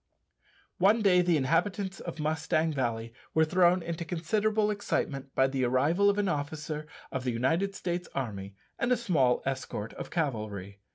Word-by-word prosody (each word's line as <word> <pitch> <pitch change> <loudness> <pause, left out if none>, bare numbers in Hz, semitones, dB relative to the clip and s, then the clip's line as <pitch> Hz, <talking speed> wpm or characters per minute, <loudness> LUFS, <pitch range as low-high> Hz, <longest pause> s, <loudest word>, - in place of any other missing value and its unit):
One 210 +4 +4
day 180 -3 +5
the 175 -2 +3
inhabitants 190 +7 0
of 170 -2 -7
Mustang 155 +1 0
Valley 115 -4 -2 0.2
were 160 0 +5
thrown 180 +1 +3
into 170 0 -4
considerable 210 +6 +1
excitement 140 -9 -2
by 135 - +5
the 135 -1 0
arrival 145 +11 +3
of 200 - +1
an 205 -1 +1
officer 150 0 -3 0.2
of 130 -1 -3
the 125 - 0
United 165 +12 0
States 175 -1 -3
army 100 -7 -4 0.2
and 240 - +1
a 250 - +4
small 155 - +2
escort 130 -5 -3
of - - -7
cavalry. 105 - -3
160 Hz, 160 wpm, -29 LUFS, 130-185 Hz, 0.2 s, day